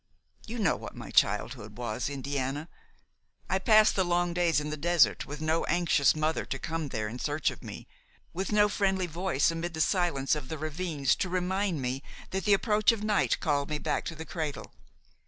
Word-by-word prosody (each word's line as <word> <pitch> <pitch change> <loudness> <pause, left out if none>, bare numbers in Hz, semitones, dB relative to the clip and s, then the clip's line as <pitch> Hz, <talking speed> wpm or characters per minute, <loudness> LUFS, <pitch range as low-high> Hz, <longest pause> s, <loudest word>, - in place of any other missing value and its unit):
You 235 +2 -5
know 200 -8 +2
what - - -9
my - - -8
childhood 110 +1 +1
was, 120 +1 -3
Indiana. 140 +2 -3 0.8
I 190 - +2
passed 215 +1 +5
the 190 - +3
long 175 0 +1
days 170 -3 +2
in 150 0 -4
the - - -2
desert, 170 +2 +3
with 145 +1 -7
no 160 +1 +1
anxious 170 -5 +3
mother 155 +1 0
to - - -4
come 165 -2 -3
there 110 -3 -2
in 120 +4 -6
search 145 +1 0
of - - -12
me, - - -8 0.5
with 190 +4 -3
no 210 0 +5
friendly 190 -2 0
voice 170 -2 0
amid 165 0 -4
the - - -5
silence 160 -6 +1
of 150 -4 -3
the 160 - -4
ravines 155 -2 -1
to 185 - -1
remind 185 -3 -1
me 125 +2 -2 0.3
that 190 -1 -2
the 205 - +5
approach 210 +2 +3
of 220 -2 -4
night 210 -2 +1
called 145 -3 0
me 150 - -1
back - - -1
to 165 - -4
the 160 +1 -7
cradle. 155 -4 -5
165 Hz, 195 wpm, -29 LUFS, 145-185 Hz, 0.8 s, passed